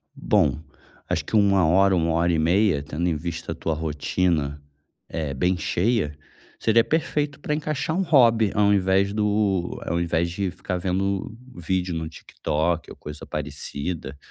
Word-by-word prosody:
Bom, 75 - +2 0.5
acho - - -1
que - - -3
1 100 -4 +4
hora, 95 +3 +4
1 85 -1 +1
hora 85 +1 +2
e 80 - +1
meia, 85 -2 +2
tendo 80 +4 -2
em 85 - +1
vista 85 +2 -5
a - - -3
tua 80 - -2
rotina, 75 -1 -1 0.5
eh, 75 -4 -3
bem 90 +8 +1
cheia, 90 -3 0 0.4
seria 115 +1 +4
perfeito 150 +1 -1
pra 150 - -2
encaixar 155 0 -2
um - - +2
hobby, 115 - +4
ao 105 0 +4
invés 95 0 +2
do 105 -4 0
ao 85 +1 0
invés 85 0 0
de 95 +2 -2
ficar 90 0 -4
vendo 95 +3 -1 0.2
vídeo 90 +1 -1
no 80 -1 -3
TikTok 80 +1 -2
ou - - -9
coisa 75 0 -9
parecida. 70 0 -5
90 Hz, 160 wpm, -24 LUFS, 80-105 Hz, 0.5 s, 1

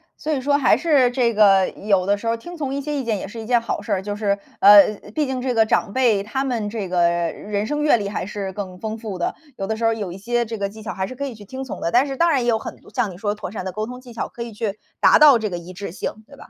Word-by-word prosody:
所 310 - -4
以 285 - +1
说 285 +2 +2
还 285 - +4
是 285 -7 +3
这 245 -2 +1
个 195 -3 +5
有 195 -3 0
的 200 +1 +2
时 230 - -6
候 230 0 +1
听 345 +9 -10
从 275 -4 -3
一 280 - -2
些 295 +1 -3
意 275 - -2
见 225 -4 -1
也 - - -6
是 225 +2 -8
一 - - -8
件 240 -1 +4
好 230 - -3
事 - - -7
儿， 185 - 0
就 205 +1 -4
是， 205 -1 0 0.2
呃， 205 +1 +8 0.2
毕 305 - +1
竟 260 -2 -3
这 255 -1 -1
个 225 - +5
长 220 -1 +1
辈 230 -6 +2
他 265 +6 -2
们 230 -5 -2
这 210 -4 -4
个 180 -1 +1
人 185 +5 -2
生 295 +5 -2
阅 295 - +5
历 200 -2 -3
还 200 - -3
是 195 -1 -5
更 185 -2 -6
丰 220 0 -4
富 215 -5 -6
的， 175 - -2 0.2
有 195 - -3
的 220 - -1
时 230 - -6
候 225 - +4
有 205 -5 -4
一 185 - -8
些 240 +4 -1
这 225 0 -5
个 200 -1 -2
技 220 +2 -12
巧 - - -4
还 190 0 -3
是 255 - -8
可 280 +2 -4
以 265 - -5
去 210 - -13
听 260 +5 -6
从 265 - -7
的。 170 - -1
但 250 +4 +4
是 270 - -4
当 340 +5 +3
然 275 -5 +2
也 - - -2
有 225 - +3
很 - - -7
多 - - -18
像 235 -7 0
你 175 - -11
说 205 +1 -1
的 - - -9
妥 210 -4 -7
善 200 -3 -6
的 185 - -3
沟 215 +4 -3
通 250 0 -8
技 250 -2 -13
巧， 230 - -3
可 235 - -7
以 235 - -8
去 210 -1 -3 0.2
达 - - +7
到 290 -5 +8
这 215 -2 -2
个 175 - -4
一 175 +2 -10
致 195 -2 -6
性， - - -4 0.2
对 280 -1 -15
吧？ - - -14
220 Hz, 355 characters per minute, -22 LUFS, 200-255 Hz, 0.2 s, 呃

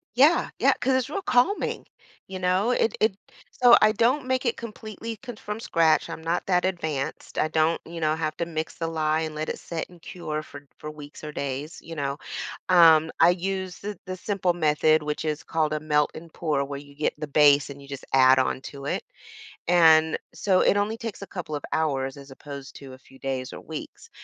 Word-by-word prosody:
Yeah, 295 +7 +5
yeah. - - +5
'Cause 260 +1 +2
it's 260 -1 0
real 395 +6 -3
calming, 255 +5 +1 0.4
you 190 0 -6
know? 185 +5 +2
It 235 - +1
it 215 -3 +2 0.4
so, 245 -1 +7
I 215 - +6
don't 255 +6 +2
make 260 0 0
it 235 - 0
completely 225 0 -7
c 245 -3 -6
from 210 0 -6
scratch, 165 -6 +2
I'm - - -6
not 170 +2 -1
that 180 -1 +2
advanced 160 -7 -3
I 155 - +2
don't, 160 +1 +2
you 165 0 -7
know, 155 -1 +2
have 155 -1 -2
to 170 - -1
mix 160 -1 -4
the 165 - -2
lye 155 -1 0
and 155 -1 -4
let 155 +1 -3
it - - -3
sit 165 -2 -5
and 175 -2 -17
cure 155 -4 -5
for 145 -1 -12
for 150 - -6
weeks 150 0 -12
or 150 - -5
days, 140 +2 -4
you 165 - -9
know? 140 -1 -2 0.5
Um, 165 -3 +6
I 175 - +7
use 185 0 -3
th 205 0 -5
the 185 0 -4
simple 190 -2 0
method, 155 -1 +3
which 150 +1 -3
is 155 -1 -2
called 155 -2 0
a 155 - -1
melt 150 -1 +1
and 165 0 -10
pour 150 -4 -1
where 140 0 -6
you 140 0 -13
get 150 +1 -1
the 150 - -4
base, 145 -1 +5
and 140 0 -10
you 140 - -14
just 140 -1 -7
add 130 0 +6
on 130 0 +1
to 140 -1 -9
it. - - -1 0.7
And 160 -2 +5 0.2
so, 185 -2 +2
it 200 - +4
only 205 +2 0
takes 225 -4 -6
a 200 - -7
couple 165 -5 -5
of 145 - -5
hours 135 -4 0
as 140 -1 -12
opposed 140 0 -9
to 135 -2 -11
a - - -11
few 135 0 -19
days 130 -1 -3
or - - -8
weeks. 160 - -9
160 Hz, 220 wpm, -25 LUFS, 150-190 Hz, 0.7 s, so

